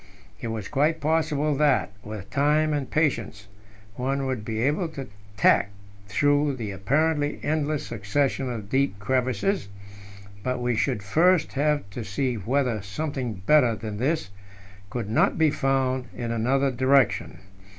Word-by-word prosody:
It - - -3
was 110 -3 -4
quite 155 +4 +1
possible 155 -1 +1
that, 145 -7 +2
with 105 -2 -8
time 150 +2 +2
and 140 -4 -2
patience, 115 -9 -1 0.5
one 135 +2 -1
would 130 -5 -2
be 110 0 -3
able 150 +6 +1
to 145 -4 -7 0.3
tack 100 - +4 0.4
through 145 +6 +2
the 110 -5 -5
apparently 145 +9 0
endless 150 -1 -1
succession 130 +5 -1
of 110 -4 -6
deep 135 -2 +1
crevasses; 130 - 0 0.7
but 125 +3 -2
we 120 -1 0
should 115 -3 0
first 165 - +3
have 145 -4 +1
to 120 - -5
see 125 +6 -1
whether 120 +1 0
something 120 -1 -4
better 125 -4 +5
than 105 0 -6
this 140 -2 -1 0.6
could 115 -1 -4
not 110 - +2
be 160 -2 +4
found 130 -2 0
in 120 -1 -3
another 135 +4 +1
direction. 130 0 +2
130 Hz, 140 wpm, -25 LUFS, 110-145 Hz, 0.7 s, better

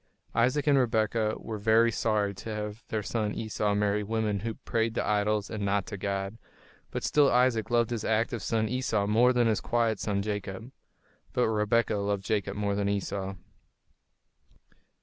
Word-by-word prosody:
Isaac 130 +5 +2
and 145 -2 +5
Rebekah 110 -2 +1
were 110 -2 -6
very 115 +2 +4
sorry 105 -2 0
to 100 - -8
have 105 +1 -5
their 110 -1 -2
son 105 +1 -2
Esau 105 -2 -1
marry 105 0 +1
women 105 -1 -1
who 110 +2 -4
prayed 115 0 -1
to - - 0
idols 105 0 +1
and 105 -2 -3
not 100 0 +1
to 100 - -6
God; 100 +2 -3 0.5
but - - -4
still 145 -2 +4
Isaac 125 -3 +2
loved 120 -1 +2
his 115 -2 -2
active 110 +1 0
son 110 +2 0
Esau 115 -4 0
more 115 +5 +4
than 120 -1 +2
his 110 -2 +1
quiet 115 -3 +1
son 100 -2 -1
Jacob. 105 +2 -5 0.6
But 125 - +2
Rebekah 110 +1 +1
loved 100 -1 -1
Jacob 100 -2 -1
more 100 -1 0
than 100 0 0
Esau. 95 -1 -2
110 Hz, 170 wpm, -28 LUFS, 100-115 Hz, 0.6 s, and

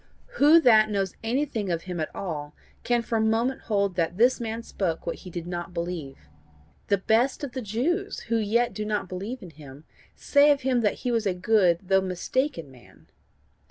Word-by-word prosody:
Who 300 +4 +7
that 220 -5 +6
knows 195 -3 -2
anything 230 -4 -1
of 170 -1 -2
him 180 -2 -5
at 155 - -2
all 150 -6 -5 0.3
can 240 -1 +1
for 225 0 -1
a - - +2
moment 225 +4 +1
hold 200 -3 0
that 170 +1 -1
this 245 +4 +4
man 230 0 -4
spoke 175 -7 -3
what 170 - -3
he 185 - -11
did 170 -1 -6
not 175 0 -6
believe? 165 - -5 0.6
The 200 - +3
best 230 +9 +1
of 280 - -4
the 260 - -5
Jews 280 - -2
who 230 0 -1
yet 225 +3 +1
do 215 - -4
not 210 -2 -2
believe 200 +7 -6
in 175 - -10
him, 145 -1 -13 0.3
say 285 +1 +4
of 285 -1 +3
him 255 -2 +1
that 210 - +1
he 245 - +1
was 225 -3 0
a 185 - 0
good 180 -3 +3
though 190 0 +3
mistaken 185 - -2
man. 125 -2 -19
210 Hz, 195 wpm, -26 LUFS, 175-240 Hz, 0.6 s, Who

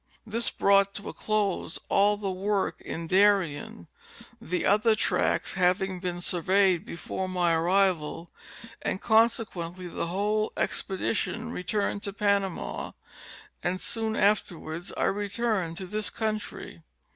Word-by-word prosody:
This 225 +2 0
brought 200 0 +3
to 205 - -5
a - - -7
close 205 -6 -1
all 205 +1 +3
the 200 -2 -2
work 195 +1 -1
in 165 - -5
Darien, 185 - +2 0.6
the 180 +3 -2
other 215 +2 +4
tracts - - +1
having 185 0 +1
been 175 -1 -3
surveyed 185 0 +2
before 185 +2 -5
my 175 -2 +2
arrival 170 -1 +1 0.5
and - - -2
conse 225 +2 +4
quently 175 -1 -7
the - - -2
whole 210 +4 0
expedition 215 +4 -1
returned 200 0 -1
to 200 - -3
Panama, 200 -3 -1 0.7
and 185 +1 -1
soon 220 +2 -2
afterwards 175 -4 0
I - - 0
returned 205 -4 -1
to 190 - -4
this 210 +3 -1
country. 215 -1 -4
195 Hz, 125 wpm, -28 LUFS, 180-210 Hz, 0.7 s, other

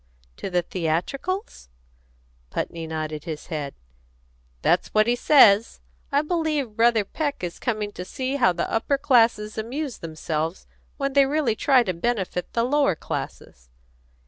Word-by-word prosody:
"To - - -5
the 180 -1 +1
theatricals?" 185 - -3 0.8
Putney 165 -1 -4
nodded 155 -1 -4
his 155 -2 -6
head. 145 -3 -4 0.9
"That's 175 - +3
what 215 0 +5
he 240 +1 +2
says. 230 -5 +5 0.3
I 285 +1 +2
believe 305 -8 -1
Brother 230 -2 +3
Peck 290 - -3
is 175 -1 -4
coming 215 -4 -2
to 180 - -7
see 260 +8 -3
how 240 -9 +4
the 170 -1 -2
upper 250 +5 0
classes 225 -6 +2
amuse 260 +4 -4
themselves 160 +1 -4 0.3
when 275 -1 -2
they 275 -1 +5
really 280 -6 +1
try 260 +1 +4
to 185 - -2
benefit 185 -1 -2
the 230 - +1
lower 275 - +2
classes." - - -7
225 Hz, 145 wpm, -24 LUFS, 175-275 Hz, 0.9 s, what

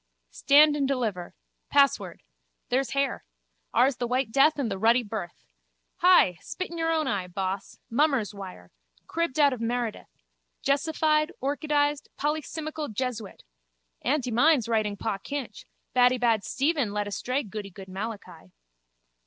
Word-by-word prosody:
Stand 295 - +5
and 280 -2 0
deliver. 220 -10 -2 0.3
Password. 275 - +2 0.5
There's 260 0 0
hair. 275 -1 -1 0.5
Ours 265 0 +3
the 240 - -2
white 250 -1 0
death 280 +5 +4
and 255 -7 -1
the 195 - -3
ruddy 230 +4 +4
birth. 205 - -7 0.5
Hi! 350 - +5
Spit 370 -2 -6
in 340 - -6
your 325 0 +1
own 315 -1 +1
eye, 195 -7 -1
boss! 190 +1 -4
Mummer's 255 -3 +1
wire. 185 - -10 0.3
Cribbed 335 -4 -2
out 285 -2 +5
of 245 - -6
Meredith. 235 -1 -3 0.5
Jesified, 305 +2 +2
orchidised, 290 +1 0
polycimical 305 0 -3
jesuit! 225 -2 -4 0.6
Aunty 260 -2 0
mine's 255 +1 +4
writing 215 -3 0
Pa 200 -1 -3
Kinch. 265 -1 -6 0.3
Baddybad 245 -4 +3
Stephen 280 -6 0
lead 205 0 -1
astray 255 +7 -2
goodygood 195 -2 -8
Malachi. 195 - -7
250 Hz, 130 wpm, -27 LUFS, 210-290 Hz, 0.6 s, Stand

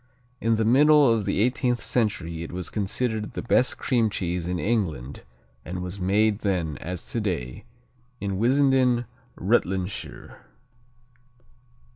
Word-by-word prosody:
In 115 0 +2
the 110 0 0
middle 145 +1 +6
of 110 -3 -1
the - - 0
eighteenth 125 +1 +1
century 90 -8 -1
it 85 - -6
was 90 -1 -5
considered 110 +1 -2
the - - -5
best 125 +1 +2
cream 115 -4 +1
cheese 90 -3 -3
in 90 0 -1
England 85 - -2 0.4
and 90 0 -5
was 90 +2 -6
made 105 +3 +2
then, 85 - -1
as 90 0 -6
today, 90 - -3 0.5
in 100 -2 -3
Wissenden, 130 -1 +3 0.3
Rutlandshire. 95 -2 -2
105 Hz, 125 wpm, -25 LUFS, 90-120 Hz, 0.5 s, middle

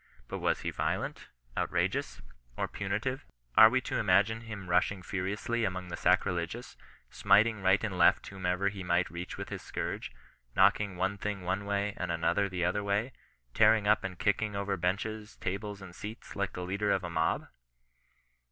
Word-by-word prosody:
But - - -5
was - - 0
he - - -2
violent, - - -2 0.3
outrageous, - - -1 0.3
or - - 0
punitive? 110 +7 -2 0.3
Are 110 - +10
we 130 +2 +1
to - - -2
imagine 105 +3 +3
him 110 -4 -8
rushing 90 +2 +1
furiously 100 +6 -2
among 90 -3 -2
the 85 - -3
sacrilegious, 90 +5 0 0.4
smiting 110 0 +4
right 95 +2 +3
and 95 -5 -2
left 85 - +5
whomsoever 95 0 -1
he 100 -1 -7
might 90 0 +1
reach 85 +1 -6
with - - -6
his - - -5
scourge; - - -4 0.4
knocking 100 -2 +4
one 95 +3 -1
thing 100 -2 -3
one 95 +3 -1
way, 100 0 0
and 90 -2 -2
another 100 +4 +1
the 90 -2 -1
other 100 +3 0
way; 105 +5 0 0.4
tearing 110 -2 +5
up 105 - +4
and 90 -2 -5
kicking 105 +1 0
over 100 0 -1
benches, 105 +4 -2
tables, 100 +1 -4
and 90 -2 -10
seats, 105 +5 -8
like 100 -1 -2
the 90 - -5
leader 100 +3 -1
of 95 -2 +2
a 90 - -4
mob 80 -1 0
100 Hz, 170 wpm, -31 LUFS, 90-105 Hz, 0.4 s, Are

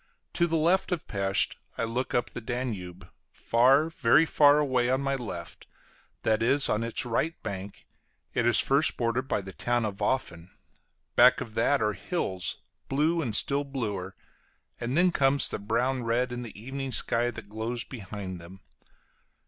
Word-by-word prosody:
To 170 - +2
the 165 0 0
left 175 +5 +2
of 175 -4 -2
Pesth 95 -1 +1 0.2
I - - -1
look 120 +3 -2
up 120 -1 0
the 125 - -7
Danube; 100 -7 -5 0.2
far, 130 +6 +3
very 155 -1 +3
far 145 -2 +5
away 130 -4 +1
on 130 +1 +2
my 140 0 -1
left, 100 -10 -6 0.6
that 110 0 +2
is, 140 +5 +4
on 110 +2 +1
its 115 +1 -2
right 155 +8 -1
bank, 100 -2 -7 0.5
it 115 - +1
is 120 -2 +4
first 140 +3 +3
bordered 120 +2 -1
by 105 - 0
the 95 0 -8
town 120 -1 0
of 100 -2 -4
Ofen; 90 -7 -2 0.7
back - - +6
of 110 - -7
that 115 +2 +2
are 105 0 +1
hills, 95 - -2 0.3
blue 155 +5 +1
and 115 -8 -2
still 140 +4 +2
bluer, 105 -9 -4 0.6
and 125 +4 -2
then 180 +1 +4
comes 140 -2 +2
the - - -3
brown 120 +5 0
red 120 +2 0
in 125 0 -4
the 115 -4 -9
evening 135 +3 -5
sky 120 0 +1
that 110 -4 -9
glows 115 +3 -2
behind 100 -6 -7
them. 95 +3 -13
120 Hz, 170 wpm, -28 LUFS, 105-135 Hz, 0.7 s, back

